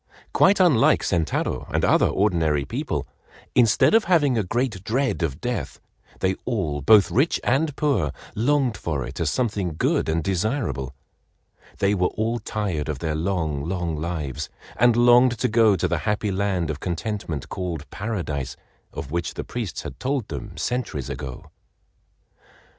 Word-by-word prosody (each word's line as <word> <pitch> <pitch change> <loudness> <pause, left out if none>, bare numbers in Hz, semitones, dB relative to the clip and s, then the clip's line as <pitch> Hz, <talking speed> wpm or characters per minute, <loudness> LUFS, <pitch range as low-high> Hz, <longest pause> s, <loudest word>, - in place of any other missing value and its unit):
Quite 200 +1 +5
unlike 165 -11 +4
Sentaro 85 -4 -1
and - - +1
other - - +4
ordinary 80 -8 +1
people, - - -3 0.5
instead 120 - +4
of 225 0 +5
having 155 -7 +3
a 110 - +2
great 110 -1 -2
dread 130 +1 0
of 75 -5 -2
death, - - -3 0.4
they 95 0 +2
all, 85 - -2
both 100 +7 +6
rich 140 +7 +2
and 145 +3 +1
poor, 140 - +1 0.2
longed 130 0 +1
for 75 -6 -2
it 65 +6 -8
as 80 -3 +1
something 100 -7 -1
good - - +1
and 80 0 0
desirable. 95 - -1 0.8
They 100 +1 +2
were 90 -3 +2
all 115 +2 -2
tired 100 -9 -3
of 75 - -2
their 80 +3 -2
long, 80 -4 -1
long 90 -3 -2
lives, 75 -3 -4 0.3
and 120 0 +4
longed 120 +1 +5
to 125 - +1
go 110 -3 +4
to - - 0
the 85 - 0
happy 105 +5 -1
land 95 -4 0
of 75 - -6
contentment 90 - -4
called 85 -5 -4
Paradise 90 - -3 0.4
of 70 - -7
which 85 0 -2
the - - -4
priests 115 -8 -5
had 65 - -8
told 130 -4 -2
them 100 -6 -7
centuries 100 - -2
ago. 65 -4 -7
95 Hz, 155 wpm, -24 LUFS, 80-120 Hz, 0.8 s, both